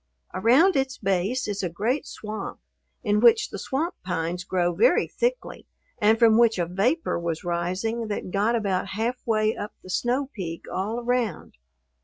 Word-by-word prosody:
Around 275 - +4
its 270 -1 0
base 195 +6 0
is 205 -1 -2
a 180 - -1
great 225 - -1
swamp, 215 0 -6 0.4
in 210 -2 +2
which 230 0 +5
the 200 - -6
swamp 315 - -2
pines 175 0 -2
grow 180 -2 0
very 235 - +4
thickly - - -3 0.3
and 220 +1 +4
from 225 -1 +5
which 230 -3 +4
a 175 - +1
vapor 205 - 0
was 170 -2 -3
rising 185 +7 -2
that 205 -3 -4
got 210 +5 +1
about 195 -4 -1
halfway 225 -2 0
up 205 - -6
the 185 - -8
snow 255 +7 0
peak 165 -5 -6
all 210 +5 -2
around. 240 -6 -1
215 Hz, 160 wpm, -25 LUFS, 185-240 Hz, 0.4 s, which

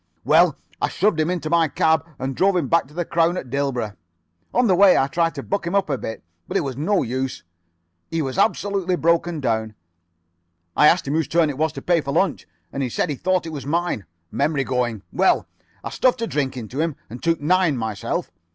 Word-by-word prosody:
"Well, - - +4 0.2
I - - +2
shoved 205 -5 +1
him 155 +1 +1
into 175 -3 -2
my 165 0 +3
cab, 160 +2 +2
and 130 0 -3
drove 185 -4 +2
back 170 -4 +3
to 150 - -18
the 175 -1 -1
'Crown' 170 +1 +1
at 125 - -6
Dilborough. 125 -6 -2 0.6
On 245 - +2
the 195 - +4
way 190 +1 +6
I 135 - +3
tried 165 +4 0
to - - -5
buck 200 -3 -2
him 175 - -1
up 195 -6 +1
a 135 - 0
bit, 110 - -6 0.2
but - - -1
it - - +1
was 135 -3 -4
no 185 +8 +1
use. 130 +2 -3 0.7
He 165 - -2
was 130 -2 -4
absolutely 195 -2 +1
broken 170 -1 +1
down. 110 -4 -1 1.0
I 150 - +6
asked 170 -2 +3
him 140 - -1
whose 160 -3 +1
turn 165 -2 +2
it 135 - -9
was 160 0 +2
to - - -8
pay 175 -2 +2
for 140 -1 -4
lunch, 170 - 0 0.3
and 140 - -3
he 130 - -1
said 135 - -1
he - - -2
thought 185 +4 0
it 160 - -6
was 140 -2 -6
mine. 165 - -1 0.2
Memory 140 0 0
going. 120 -5 -1
Well, - - +3 0.4
I - - -5
stuffed 250 -2 +1
a - - +2
drink 140 - -2
into 125 +5 -4
him 165 -3 -1
and 120 +3 -9
took 165 0 +1
nine 170 -1 +2
myself. 110 -3 -3
155 Hz, 220 wpm, -22 LUFS, 130-175 Hz, 1.0 s, way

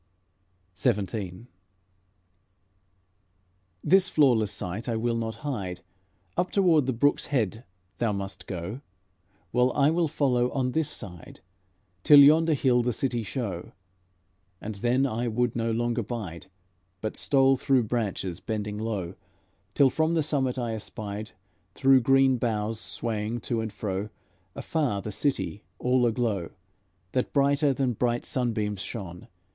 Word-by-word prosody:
XVII 100 +1 -1 2.4
"This 190 0 +4
flawless 120 -9 +3
sight 100 +7 -5
I 115 - 0
will 115 +1 0
not 110 -1 -3
hide; 95 -11 -3 0.5
Up 180 - 0
toward 170 -8 +3
the - - +2
brook's 145 +4 +1
head 115 -5 -1 0.4
thou 115 -2 +1
must 100 -1 -5
go, 95 +7 -5 0.7
While 125 +1 +3
I 145 +1 +3
will 170 0 +1
follow 125 -5 +1
on 130 -2 0
this 160 +2 0
side, 90 -5 -9 0.6
Till 145 - +8
yonder 155 +3 +6
hill 125 -3 +3
the 125 +1 0
city 120 0 -1
show." 105 -5 -5 0.9
And 110 - -5
then 120 +6 +1
I 120 -1 -1
would 120 +1 0
no 115 -1 0
longer 120 +1 0
bide, 100 -7 -6 0.5
But 110 - -4
stole 135 -1 +3
through 130 -1 +2
branches, 105 -6 -2
bending 105 -1 -4
low, 100 -6 -3 0.6
Till 135 -2 +5
from 160 +3 +1
the 160 - +2
summit 135 -4 0
I 120 -2 -2
espied, 105 0 -6 0.5
Through 135 -1 +5
green 135 +1 +4
boughs 110 -2 -1
swaying 115 0 -3
to 115 0 -1
and 110 -1 -4
fro, 100 0 -3 0.5
Afar, 130 -11 -1
the 105 - -4
city, 110 -3 -1
all 125 0 +2
aglow, 110 -7 -1 0.6
That 125 - -1
brighter 140 +1 +3
than 130 -1 0
bright 120 +1 -1
sunbeams 110 -6 -1
shone. 90 -7 -7
120 Hz, 135 wpm, -27 LUFS, 105-135 Hz, 2.4 s, Till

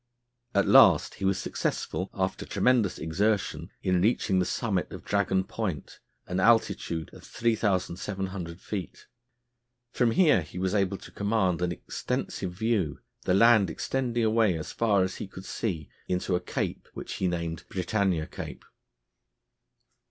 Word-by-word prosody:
At 100 - +4
last - - +6
he - - 0
was 95 0 +2
successful, 95 - -2
after 95 -1 -1
tremendous 120 -7 +2
exertion, 85 -1 -1
in 90 -2 +2
reaching 100 -2 +2
the 90 - +2
summit 100 -5 -1
of - - -9
Dragon 95 -2 +1
Point, 95 -6 -4 0.3
an 90 +1 -2
altitude 95 -6 +2
of - - -13
3700 95 -4 -2
feet. 95 -4 -6 0.9
From 120 -2 +3
here 150 - +4
he 80 +3 -10
was 95 +1 0
able 100 -2 +1
to - - -13
command 100 -4 0
an 90 0 +1
extensive 90 +1 -3
view, 100 -5 0 0.3
the 90 - +3
land 110 -3 +6
extending 120 +5 -1
away 110 -5 +3
as 80 - -6
far 105 -5 +2
as 95 0 -3
he - - -5
could 95 0 -11
see 85 -10 -3 0.2
into 90 +1 -1
a - - +1
cape - - -3
which - - -6
he 95 - 0
named 85 -2 -3
Britannia 95 -3 0
Cape. - - -8
95 Hz, 145 wpm, -28 LUFS, 90-110 Hz, 0.9 s, last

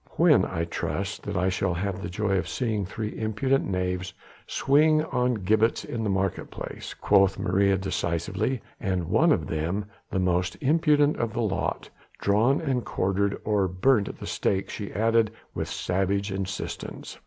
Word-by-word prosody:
"When, - - +5
I 85 0 -2
trust, 85 - -3
that - - -2
I 90 +1 +2
shall 95 -1 0
have 95 +2 -2
the 85 - -4
joy 100 +2 0
of - - -4
seeing 110 -6 -1
three 110 +1 -5
impudent 110 +5 +1
knaves 90 -1 -2 0.3
swing 155 +2 +3
on 125 -5 0
gibbets 110 +3 +1
in 115 -2 -3
the 105 - 0
market 95 -1 -1
place," - - -7
quoth 95 -1 +3
Maria 100 +2 +2
decisively, 95 +5 -2 0.2
"and 95 -5 -1
one - - +4
of - - +2
them 85 +6 -2 0.2
the - - -2
most 90 0 +1
impudent 150 0 +3
of 115 -2 -2
the 120 - -1
lot 105 -4 -1 0.3
drawn 110 +8 +3
and 130 -6 -1
quartered, 100 +2 0
or 105 -3 +2
burnt 100 +4 +2
at - - -8
the - - -8
stake!" 95 -1 -1
she 105 -2 -5
added 115 +2 +2 0.2
with - - -3
savage 95 +2 -1
insistence. 95 +1 -5
100 Hz, 165 wpm, -26 LUFS, 95-115 Hz, 0.3 s, When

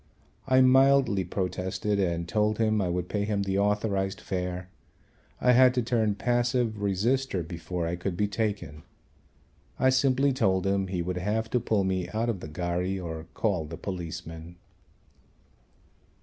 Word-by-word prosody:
I 130 0 +5
mildly 130 -5 +5
protested 95 +3 -2
and 85 -3 0
told 105 +2 +1
him 110 -2 +2
I 90 - 0
would 90 0 -2
pay 105 +1 -1
him 105 -1 0
the 95 0 0
authorised 100 -1 0
fare. 90 -1 -4 0.7
I 125 - +4
had 125 +1 +6
to 125 - +1
turn 110 -3 +1
passive 120 -1 0
resister 100 +1 0
before 85 +1 -4
I 85 +1 -1
could 90 0 -3
be 105 - +1
taken. 105 -8 -3 1.0
I 130 - +4
simply 135 +1 +3
told 95 -8 +1
him 95 0 +1
he 90 -2 -2
would 90 +1 -3
have 110 +4 -1
to 125 - +2
pull 110 -4 +1
me 95 -2 -1
out 115 +2 0
of 105 -5 -2
the 80 - -8
ghari 90 +4 -2
or 80 -2 -6
call 95 -8 0
the 80 +2 -8
policeman. 85 -2 -6
100 Hz, 155 wpm, -27 LUFS, 90-115 Hz, 1.0 s, had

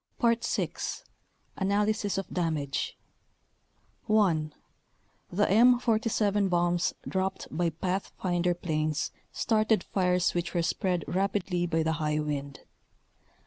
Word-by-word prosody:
VI. 235 -1 +1 0.9
Analysis 205 +1 +1
of 195 - -2
Damage 155 -6 -1 1.1
1. 175 -8 +2 0.8
The 205 +4 +2
M47 220 -3 +3
bombs 175 0 +1
dropped 190 0 -2
by 170 +1 +1
pathfinder 180 +1 -1
planes 155 -3 -1 0.2
started 215 -1 +2
fires 180 -2 +1
which 175 +1 -2
were 170 - +2
spread 180 -1 0
rapidly 185 -2 0
by 165 -1 +1
the 160 - +1
high 150 0 +1
wind. 145 -2 -3
180 Hz, 100 wpm, -29 LUFS, 165-205 Hz, 1.1 s, M47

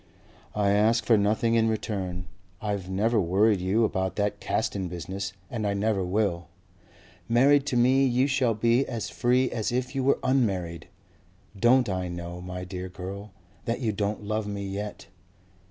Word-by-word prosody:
"I 100 -1 +2
ask 110 +2 +3
for 115 - +5
nothing 110 +3 +2
in 115 -1 +3
return. 95 -5 -3 0.3
I've 100 -3 -3
never 105 +4 +2
worried 95 +3 +3
you 100 +5 +2
about 95 -3 -1
that 105 0 -1
Caston 95 -2 -1
business 95 +3 -5 0.2
and 110 -4 -3
I 100 - 0
never 100 -1 0
will. 90 -3 -1 0.8
Married 140 +4 +4
to 125 - 0
me 130 +3 +4
you 125 +1 +2
shall 135 -5 +1
be 115 +4 +3
as 115 -2 -4
free 125 +1 +2
as 110 -1 -2
if 125 +1 -2
you 135 -2 -1
were 140 - +3
unmarried. 95 - 0 0.7
Don't 120 +4 +4
I 95 -2 -2
know, 85 0 -6
my 90 0 -6
dear 90 0 -6
girl, 95 +3 -7 0.4
that 115 0 -1
you 115 -5 0
don't 105 +1 -2
love 105 0 -2
me 100 -1 -4
yet. 100 +2 -5
105 Hz, 165 wpm, -27 LUFS, 95-115 Hz, 0.8 s, for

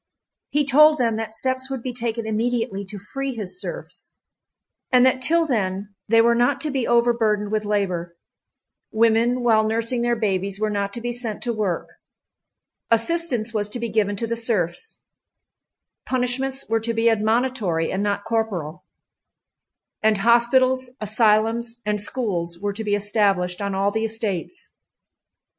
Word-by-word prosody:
He 295 0 +1
told 305 +3 +6
them 230 -3 +1
that 220 0 -5
steps 260 +3 -2
would 265 -3 -5
be 255 - -4
taken 230 -1 -3
immediately 225 -1 -1
to 205 +2 -8
free 270 +6 -5
his 215 - -4
serfs—and 250 0 -4
that 260 0 +2
till 330 +5 +4
then 200 -6 -2
they 225 +1 +5
were 235 +1 +4
not 245 +4 +2
to 300 - -1
be 265 -3 -1
overburdened 230 -3 +2
with 215 -1 -1
labor, 180 -5 -2 0.7
women 230 +2 +2
while 220 -2 +4
nursing 230 +2 0
their 240 0 +1
babies 195 -2 -1
were 215 0 0
not 200 -1 -2
to 235 - -5
be 240 +1 -3
sent 235 -3 -3
to 240 - -1
work, 200 -6 -2 1.0
assistance 235 -1 +1
was 210 -1 -1
to 240 - -5
be 235 0 -3
given 205 -2 +1
to 230 - -2
the 230 +1 -2
serfs, 225 - -2 1.0
punishments 260 +2 -1
were 225 0 +1
to 230 +1 -2
be 225 +1 +2
admonitory 220 -6 +1
and 190 - -1
not 205 0 -1
corporal, 190 -7 -3 1.2
and 215 -1 +3
hospitals, 250 +4 +3
asylums, 225 +2 +1
and 210 -1 0
schools 185 -8 -2
were 205 +1 -2
to 220 +2 -5
be 205 -1 +1
established 200 -3 +1
on 200 -1 -2
all 195 +1 +1
the 220 +2 -1
estates. 220 - -4
225 Hz, 150 wpm, -22 LUFS, 205-245 Hz, 1.2 s, told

